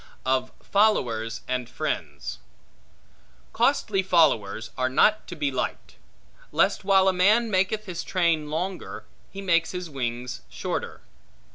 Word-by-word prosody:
Of 130 0 +1
Followers 115 - +1
And 125 -2 -2
Friends - - -4 1.1
COSTLY 195 -2 +2
followers 115 - +2
are 130 0 0
not 215 +11 +3
to 175 - -7
be 145 -3 -1
liked; 130 - -4 0.5
lest - - +2
while 190 -1 +4
a 190 - +4
man 215 +5 +3
maketh 195 +3 +1
his 175 -3 -5
train 165 -5 +1
longer, 180 +4 -4 0.2
he 195 0 -8
make 170 -3 +3
his 180 -3 -6
wings 125 -2 -4
shorter. - - -4
170 Hz, 125 wpm, -25 LUFS, 130-190 Hz, 1.1 s, while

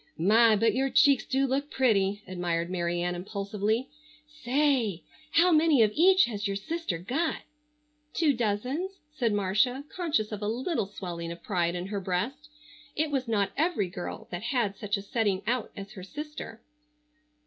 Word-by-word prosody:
"My, 220 +6 +5
but 225 +2 +2
your 270 +2 +1
cheeks 280 -1 +4
do 270 +1 +1
look 275 +2 -1
pretty," 205 -7 +1
admired 175 -1 -2
Mary 175 -1 -1
Ann 175 0 -1
impulsively. 205 +5 -2 0.4
"Say, 270 - 0 0.3
how 350 +3 +4
many 310 -6 +5
of 210 - +2
each 370 - +6
has 210 -3 -3
your 200 - -2
sister 210 - -3
got?" 265 - -2 0.7
"Two 310 -4 +2
dozens," 250 - -1 0.2
said 245 -7 0
Marcia 210 +7 +1
conscious 300 -13 0
of 210 -1 -5
a 205 - -2
little 245 - -1
swelling 170 -4 -6
of 170 0 -9
pride 175 -4 0
in 175 0 -3
her 200 0 -3
breast. 240 +12 -3 0.5
It 305 0 0
was 265 -3 -1
not 205 -4 +1
every 305 - +1
girl 180 -1 -6
that 175 0 -4
had 235 -4 0
such 205 +1 -2
a 200 - -7
setting 200 -3 0
out 240 +1 -1
as 200 0 -7
her 190 - -9
sister. 290 -1 -8
220 Hz, 165 wpm, -28 LUFS, 195-275 Hz, 0.7 s, each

